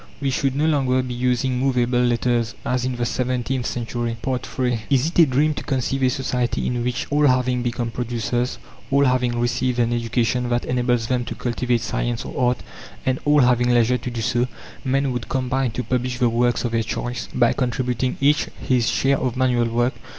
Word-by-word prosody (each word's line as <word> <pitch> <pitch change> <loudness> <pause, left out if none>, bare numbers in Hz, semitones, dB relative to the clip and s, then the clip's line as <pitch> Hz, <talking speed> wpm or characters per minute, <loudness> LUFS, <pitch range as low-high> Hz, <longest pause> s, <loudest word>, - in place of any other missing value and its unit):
We 140 -1 0
should 135 0 0
no 150 +2 +1
longer 130 -4 +2
be 125 -1 -5
using 125 +1 0
movable 125 -2 +1
letters, 120 -1 +1
as 125 0 0
in 130 -1 -1
the 120 0 -1
seventeenth 125 0 -1
century. 120 -1 -3
III 125 -2 -1
Is 135 -1 +3
it 170 +2 0
a 165 - +9
dream 145 +4 +2
to - - -6
conceive 135 0 -1
a 130 - +4
society 125 -2 -1
in 120 -1 -1
which 125 0 -2
all 145 0 +4
having 125 -1 +2
become 120 -1 -2
producers, 120 +1 -2 0.3
all 140 +1 +4
having 125 -2 +1
received 125 +1 0
an 120 -1 +2
education 120 +1 0
that 120 0 0
enables 125 -2 +1
them 125 +1 0
to - - -5
cultivate 120 -1 -1
science 120 0 -2
or 125 -1 +1
art, 125 - -3 0.4
and 130 0 +1
all 145 0 +5
having 125 -1 +3
leisure 120 +1 +3
to - - -5
do 120 -2 -4
so 120 +3 +1 0.4
men 135 0 +1
would 120 -3 -4
combine 130 0 0
to 125 +3 -4
publish 125 0 -1
the 125 -2 +3
works 120 +1 +1
of 120 - -1
their 115 0 +1
choice, 120 +2 -4
by 120 - +3
contributing 125 0 -1
each 145 +2 +3
his 120 -3 +1
share 135 +2 +2
of 125 -1 -2
manual 125 -2 +2
work? 120 +2 +1
125 Hz, 195 wpm, -22 LUFS, 120-130 Hz, 0.4 s, a